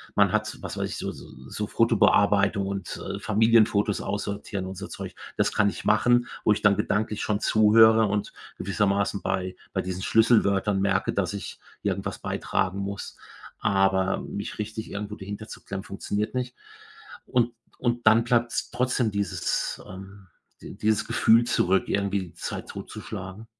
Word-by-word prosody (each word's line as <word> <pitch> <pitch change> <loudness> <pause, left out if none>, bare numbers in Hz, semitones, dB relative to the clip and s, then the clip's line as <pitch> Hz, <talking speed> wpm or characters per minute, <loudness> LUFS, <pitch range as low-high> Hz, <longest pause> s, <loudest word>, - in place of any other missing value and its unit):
man - - +4
hat, - - -1
was - - -6
weiß - - -2
ich, - - -5
so - - -3
so - - -7
Fotobearbeitung 100 -1 +3
und 100 -2 -5 0.2
Familienfotos 110 -1 +3
aussortieren 100 -1 -4
und 95 - -6
so - - -6
Zeug, - - -7 0.2
das - - +1
kann 100 -1 +3
ich - - -8
machen, 120 +3 +3 0.2
wo - - +5
ich 105 - -4
dann 105 -1 +5
gedanklich 105 0 -1
schon 105 -1 0
zuhöre 110 +1 +6
und 105 0 -2 0.3
gewissermaßen 100 +1 0
bei 95 0 -2 0.2
bei - - 0
diesen 95 0 -5
Schlüsselwörtern 105 -3 +3
merke, 95 -1 +1
dass 95 -2 -1
ich 100 -4 -7 0.2
irgendwas - - -2
beitragen 95 0 -1
muss, 100 +1 -5 0.4
aber 95 -1 +2
mich 100 +1 -6
richtig 110 +1 -5
irgendwo 105 +1 -5
dahinterzuklemmen 100 -1 -7
funktioniert 105 +3 -3
nicht. 125 -1 -3 0.7
Und 120 -1 +1 0.3
und 120 -1 -1
dann 110 +1 +6
bleibt's 120 0 +1
trotzdem 125 -2 0
dieses 100 -3 -2
ähm, 95 +1 -11 0.3
dieses 105 -1 -1
Gefühl 115 +1 +4
zurück, 95 -4 +2
irgendwie 100 0 0
die 90 -3 -9
Zeit 85 - -6
totzuschlagen. 100 +1 -8
100 Hz, 145 wpm, -26 LUFS, 95-110 Hz, 0.7 s, zuhöre